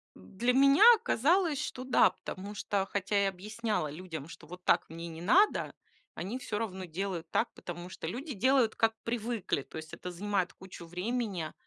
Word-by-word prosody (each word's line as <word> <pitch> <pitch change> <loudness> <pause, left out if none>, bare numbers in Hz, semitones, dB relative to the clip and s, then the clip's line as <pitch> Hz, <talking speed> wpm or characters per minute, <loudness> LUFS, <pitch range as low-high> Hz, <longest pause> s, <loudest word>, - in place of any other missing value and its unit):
Для 190 - -1
меня 275 +7 +6
оказалось, 330 - +2
что 255 - -5
да, 250 -6 +5
потому 195 +2 -8
что, 200 -1 -1
хотя 200 +1 0
я 195 - +3
объясняла 210 -2 -3
людям, 160 -2 -7
что 165 -2 -12
вот 180 +2 -10
так - - +2
мне 165 +1 -7
не 165 0 -8
надо, 360 - +3 0.4
они 210 +9 -4
всё 220 -4 -3
равно 190 -4 -4
делают 175 -1 -4
так, - - 0
потому 175 +1 -8
что 175 - -7
люди 265 - -4
делают, 245 +1 +3
как 225 0 +2
привыкли. 230 -8 -2
То - - -10
есть 155 0 -8
это 180 - -6
занимает 185 -1 -1
кучу 185 -2 -11
времени, 185 -1 -3
200 Hz, 175 wpm, -31 LUFS, 175-240 Hz, 0.4 s, меня